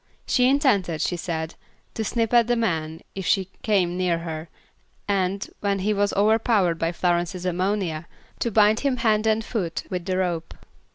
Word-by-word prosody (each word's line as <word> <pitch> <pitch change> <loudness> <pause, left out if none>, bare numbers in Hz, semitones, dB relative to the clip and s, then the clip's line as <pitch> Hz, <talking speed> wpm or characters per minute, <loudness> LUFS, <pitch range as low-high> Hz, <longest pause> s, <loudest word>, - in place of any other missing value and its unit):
She 250 0 +3
intended, 205 - +2
she 175 - 0
said, 165 -1 -3 0.4
to 220 - -2
snip 225 +1 -1
at 235 -1 +5
the 240 - +2
man 160 -8 -1
if 190 -2 -5
he 190 -2 +2
came 190 -7 +1
near 180 -2 +1
her, 165 -1 -6 0.6
and, 195 -1 0
when 200 -1 0
he 200 +3 0
was 205 0 +1
overpowered 205 -4 +2
by 165 0 0
Florence's 175 +1 -1
ammonia, 180 -3 -1 0.3
to 235 - 0
bind 215 0 +4
him 275 -3 0
hand 220 -2 +2
and 220 0 +1
foot 180 -8 -3
with 180 -2 -3
the 185 -1 -1
rope. 175 -3 -2
190 Hz, 170 wpm, -24 LUFS, 175-220 Hz, 0.6 s, at